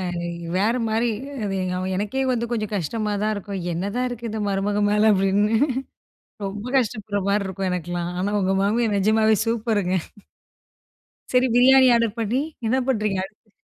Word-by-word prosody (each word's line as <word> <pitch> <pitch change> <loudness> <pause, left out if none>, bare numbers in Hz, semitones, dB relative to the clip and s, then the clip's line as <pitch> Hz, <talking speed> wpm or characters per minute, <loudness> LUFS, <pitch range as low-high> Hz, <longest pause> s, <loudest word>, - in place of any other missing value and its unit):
அ - - -3 0.5
வேற 210 +4 +2 0.2
மாரி. 225 +2 +1 0.3
அது 195 -1 -2
எங்க 180 0 -2 0.2
எனக்கே 210 +7 -1
வந்து 235 -1 -1
கொஞ்சம் 215 -2 -2
கஷ்டமா 210 +4 -2
தான் 215 - +1
இருக்கும். 200 -2 -5
என்னதான் 200 +9 -2
இருக்கு 235 -1 -5
இந்த 220 0 -4
மருமக 200 +1 0
மேல 210 +1 +4
அப்படின்னு. 195 +3 +2 0.9
ரொம்ப 205 +3 -6
கஷ்டப்படுற 215 -4 -2
மாரி 200 0 +1
இருக்கும் 190 0 -3
எனக்குலாம், 175 0 -3
ஆனா 200 - 0
உங்க 190 0 +1
மாமியார் 220 +2 +1
நிஜமாவே 220 +2 +3
சூப்பருங்க. 215 -5 0 1.4
சரி, 255 0 +4
பிரியாணி 260 +1 +7
ஆர்டர் 230 -2 +1
பண்ணி, 230 +4 0 0.3
என்ன 255 +4 +2
பண்ணுறீங்க 210 -6 0
அடுத் 210 +2 -20
210 Hz, 150 wpm, -23 LUFS, 195-230 Hz, 1.4 s, பிரியாணி